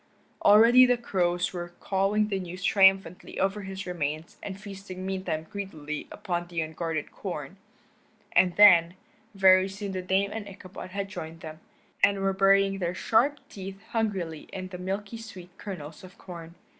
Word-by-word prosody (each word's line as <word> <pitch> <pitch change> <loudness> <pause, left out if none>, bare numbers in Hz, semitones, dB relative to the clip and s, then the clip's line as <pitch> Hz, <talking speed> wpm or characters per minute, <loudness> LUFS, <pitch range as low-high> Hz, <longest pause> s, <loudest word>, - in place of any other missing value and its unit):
Already 230 +5 +7
the 245 0 +3
crows 180 -6 0
were 175 -1 -6
cawing 205 +2 +1
the 195 -2 -1
news 180 0 -7
triumphantly 190 -3 +3
over 195 +2 0
his 190 0 -6
remains 155 -2 -4
and 195 -1 -7
feasting 195 -2 -8
meantime 185 -5 -3
greedily 155 -7 -6
upon 175 -4 -3
the 170 -1 -4
unguarded 160 0 -4
corn, - - -6 0.7
and 180 -2 +3
then, 180 -4 +7 0.4
very 190 0 +6
soon 195 +1 -6
the 185 -1 -3
Dame 190 +2 +1
and 215 -2 -5
Ichabod 185 -1 -10
had 200 +1 -4
joined 165 -5 -8
them, 155 0 -9 0.4
and 200 0 +5
were 195 0 +1
burying 195 0 +3
their 175 -1 -2
sharp 265 +9 +2
teeth 195 0 -8
hungrily 190 -9 -2
in 185 -1 -6
the 180 -1 -8
milky 200 +4 -4
sweet 185 -5 -11
kernels 160 -6 -8
of 185 -1 -13
corn. 170 -2 -10
190 Hz, 155 wpm, -27 LUFS, 175-200 Hz, 0.7 s, Already